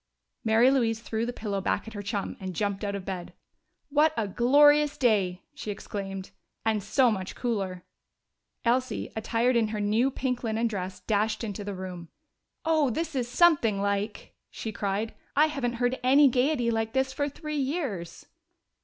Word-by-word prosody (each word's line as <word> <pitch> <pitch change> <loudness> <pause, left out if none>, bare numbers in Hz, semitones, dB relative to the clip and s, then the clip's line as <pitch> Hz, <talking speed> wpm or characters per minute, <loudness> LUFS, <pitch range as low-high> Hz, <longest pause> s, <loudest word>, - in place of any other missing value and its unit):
Mary 225 +3 +5
Louise 230 -5 +1
threw 230 0 -3
the - - -1
pillow 205 -4 -3
back 200 - -1
at 225 - -8
her 205 - -5
chum 200 0 -3
and 185 -2 -5
jumped 200 +1 -1
out 200 -1 -2
of 195 -2 -6
bed. 185 -2 -5 0.6
"What 300 +2 +3
a 220 -2 0
glorious 290 +7 +5
day!" 200 -9 +2
she 290 -7 -7
exclaimed. 195 -1 -5 0.3
"And 220 -2 +2
so 240 +5 +3
much 190 -3 -4
cooler." 195 -7 -2 0.8
Elsie, 255 +2 0
attired 230 +3 +1
in 230 -2 +3
her 215 0 -4
new 215 +5 +2
pink 255 -2 -2
linen 225 0 0
dress, 185 -4 -3
dashed 215 +3 0
into 205 -2 -4
the 200 -1 -5
room. 180 -3 -7 0.6
"Oh, 315 -4 +3
this 320 +6 -2
is 250 -3 -1
something 250 - +4
like!" 200 +1 -2 0.2
she 220 - -5
cried. 205 +2 -2 0.2
"I 300 - +6
haven't 275 -6 -2
heard 245 +2 0
any 275 +3 +6
gayety 250 -1 +1
like 225 -1 -1
this 265 0 +1
for 285 +1 -1
three 305 +1 -5
years!" 265 - -3
225 Hz, 170 wpm, -27 LUFS, 200-260 Hz, 0.8 s, I